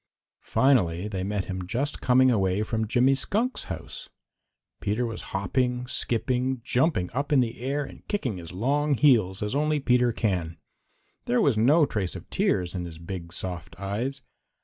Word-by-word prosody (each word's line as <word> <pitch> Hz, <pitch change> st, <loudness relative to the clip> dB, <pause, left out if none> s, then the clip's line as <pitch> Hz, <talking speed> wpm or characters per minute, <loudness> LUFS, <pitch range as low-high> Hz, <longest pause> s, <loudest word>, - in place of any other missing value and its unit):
Finally 100 Hz, -9 st, +2 dB
they 95 Hz, -3 st, -3 dB
met 100 Hz, 0 st, -2 dB
him 95 Hz, -1 st, -5 dB
just 135 Hz, +9 st, -2 dB
coming 130 Hz, 0 st, +5 dB
away 95 Hz, -2 st, +1 dB
from 110 Hz, 0 st, -2 dB
Jimmy 125 Hz, +4 st, +4 dB
Skunk's 215 Hz, -, -1 dB
house. -, -, -7 dB, 0.7 s
Peter 105 Hz, +4 st, -1 dB
was 115 Hz, -1 st, -5 dB
hopping, 125 Hz, +6 st, -1 dB
skipping, 125 Hz, +1 st, -1 dB
jumping 125 Hz, -, +1 dB
up 140 Hz, +5 st, -2 dB
in 145 Hz, -, +5 dB
the 120 Hz, -2 st, -1 dB
air 140 Hz, +3 st, -1 dB
and -, -, -13 dB
kicking 130 Hz, -, -2 dB
his 85 Hz, -2 st, -9 dB
long 140 Hz, +9 st, +1 dB
heels 110 Hz, -9 st, +3 dB
as 105 Hz, -, -2 dB
only 150 Hz, +1 st, +1 dB
Peter 125 Hz, -2 st, +3 dB
can. 90 Hz, -8 st, -1 dB, 0.7 s
There 125 Hz, -, +2 dB
was 140 Hz, -, +3 dB
no 145 Hz, +9 st, +5 dB
trace 105 Hz, -9 st, -3 dB
of -, -, -9 dB
tears 90 Hz, -1 st, +1 dB
in 90 Hz, -2 st, -3 dB
his 85 Hz, -2 st, -8 dB
big, 85 Hz, 0 st, -7 dB
soft 85 Hz, -2 st, -5 dB
eyes. 120 Hz, +8 st, -3 dB
120 Hz, 165 wpm, -26 LUFS, 95-130 Hz, 0.7 s, coming